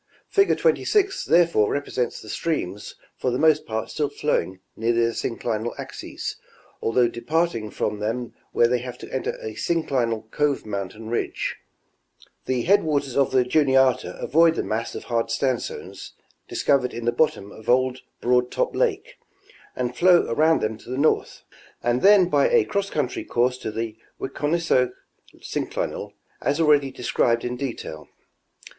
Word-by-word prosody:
Fig. 395 0 +3
26 410 -4 +2
therefore 170 -11 +4
represents 140 -3 -2
the - - -13
streams 105 - -3 0.2
for 130 - 0
the 125 - 0
most 155 +1 +3
part 110 0 -3
still 150 -2 -1
following 95 -10 -1 0.2
near 115 +1 +1
their 115 0 +2
synclinal 115 0 -3
axes, - - -6 0.4
although 120 +1 +3
departing 120 -1 -1
from 105 0 -2
them 115 +3 -3 0.2
where 120 - +4
they 125 +1 +1
have 125 0 -7
to - - -11
enter 130 - -2
a 110 - -6
syncli 135 -5 0
nal 115 -1 -3
cove 145 -2 0
mountain 105 +2 -5
ridge; 120 - -2 0.9
the 125 -2 0
headwaters 150 -9 +2
of 140 -1 +3
the 130 -1 +3
Juniata 130 -1 +2
avoid 165 +1 +4
the - - -1
mass 110 +2 -3
of - - -6
hard 115 -1 -1
sandstones 130 -3 -3 0.3
discovered 130 -3 +1
in 120 0 -5
the 120 - +3
bottom 120 -6 0
of 110 - -10
old 130 +1 +3 0.2
Broad 125 0 +2
Top - - -1
lake, - - -1 0.6
and 125 -1 -2
flow 180 +2 +5
around 155 +6 +3
them 110 0 -2
to - - -14
the 130 - -3
north, 150 +3 +1 0.4
and 120 +1 +1
then 195 -2 +7
by - - +3
a 470 -4 +4
cross 200 - -1
country 145 -8 -2
course 125 +1 0
to - - -4
the 110 0 -4 0.2
Wiconisco 145 -4 0 0.5
synclinal, - - -3 0.3
as 145 +3 0
already 150 -3 +4
described 120 -2 0
in 125 0 -2
detail. 120 - -6
125 Hz, 155 wpm, -24 LUFS, 115-150 Hz, 0.9 s, then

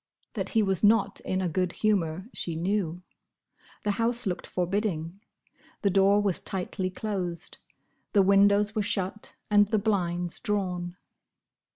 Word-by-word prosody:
That - - 0
he 220 - +5
was 195 -2 0
not 205 -2 +3
in 185 0 -2
a - - +1
good 180 +2 -1
humour 185 -4 0
she 170 - -3
knew. 180 0 -1 0.8
The 210 - +1
house 235 +1 +1
looked 180 -3 -3
forbidding. 180 -1 -2 0.6
The 200 - +3
door 195 +2 +4
was 195 -4 +2
tightly 185 0 -3
closed. 180 -4 -4 0.5
The 200 -3 +5
windows 200 +2 +4
were 215 - 0
shut, 200 0 -2 0.2
and 205 0 +5
the 215 - +1
blinds 180 -5 -1
drawn. 180 -5 -2
195 Hz, 140 wpm, -27 LUFS, 180-205 Hz, 0.8 s, he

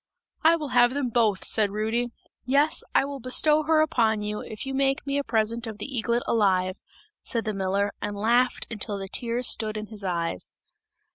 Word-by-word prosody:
'I 325 +1 +6
will 305 -4 -5
have 245 0 +4
them 280 -3 -1
both!' 220 -5 +1
said 215 -2 +1
Rudy. 220 +4 -1 0.3
'Yes, 285 +5 +2
I - - +4
will 280 0 -6
bestow 300 +5 +3
her 310 0 +3
upon 225 -9 +1
you, 210 0 -3
if 215 +3 -8
you 270 - -4
make 270 0 0
me 280 0 0
a - - -1
present 230 0 -1
of 220 -2 -6
the 210 - -5
eaglet 235 +1 0
alive!' 185 -4 +1 0.4
said 230 -3 -2
the 215 - -1
miller 195 +1 0
and 205 0 -4
laughed 240 +4 +2
until 210 -2 -2
the 195 0 -6
tears 235 +4 0
stood 215 -1 +1
in 215 - -4
his 210 -2 -8
eyes. 170 - -3
230 Hz, 195 wpm, -26 LUFS, 210-265 Hz, 0.4 s, I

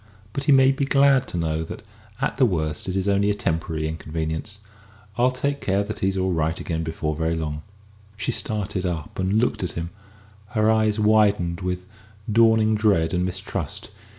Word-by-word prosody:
But 140 - -2
he 150 - +4
may 135 -1 +6
be 140 +1 -1
glad 135 -1 +4
to - - -4
know 80 -1 -1
that, - - -8 0.4
at - - -1
the 135 - +5
worst, 80 -3 -2
it 95 - -2
is 95 +1 0
only 100 0 +2
a 105 - +1
temporary 80 -3 -2
inconvenience. 80 +4 -4 0.6
I'll 125 +1 +3
take 140 +2 -2
care 100 +1 +1
that 110 +1 -6
he's 95 0 0
all 95 -1 +1
right 80 0 0
again 80 -2 -3
before 80 -1 -2
very 80 +1 0
long." 75 -2 -3 0.6
She - - -1
started 100 -3 -2
up 85 -3 -4
and 95 +1 0
looked 115 +3 +1
at 90 - -3
him, 85 +1 -4 0.7
her 110 +1 +4
eyes 110 -1 +2
widened 105 -5 +3
with 90 0 -3 0.5
dawning 110 0 +4
dread 100 -7 +2
and 90 0 +1
mistrust. 95 +1 -4
95 Hz, 180 wpm, -23 LUFS, 80-110 Hz, 0.7 s, may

